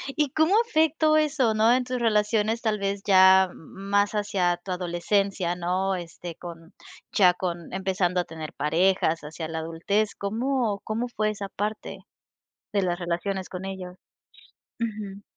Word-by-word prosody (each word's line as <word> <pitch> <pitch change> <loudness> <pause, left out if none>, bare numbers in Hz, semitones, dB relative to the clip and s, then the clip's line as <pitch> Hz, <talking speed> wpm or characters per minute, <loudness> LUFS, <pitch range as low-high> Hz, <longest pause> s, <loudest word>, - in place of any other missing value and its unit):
¿Y 295 -2 +1
cómo 315 +6 +3
afectó 315 -4 +3
eso, 290 -7 +2
no? 220 +2 +4
En 255 0 +2
tus 250 -1 -3
relaciones 220 0 +1
tal 215 -2 0
vez 200 0 -2
ya 190 -1 +6
más 200 +4 -1
hacia 200 -5 0
tu 185 +1 -8
adolescencia, 180 +1 0
¿no? 185 +2 -1
Este, 175 -1 -7
con 165 -1 -11 0.4
ya 180 -3 +5
con 175 -2 -5
empezando 185 -1 0
a - - +1
tener 160 -1 -8
parejas 165 +2 +1
hacia 160 +2 -6
la 160 0 -4
adultez, 170 +6 -1
¿cómo 225 0 -1
cómo 230 +3 -2
fue 215 -3 -1
esa 200 -2 -4
parte 210 +2 -4 0.7
de 200 - +2
las 175 -2 0
relaciones 180 +2 -3
con 185 +1 -6
ellos? 185 -2 -6 0.8
Ujú. 205 -3 -5
195 Hz, 150 wpm, -26 LUFS, 175-215 Hz, 0.8 s, ya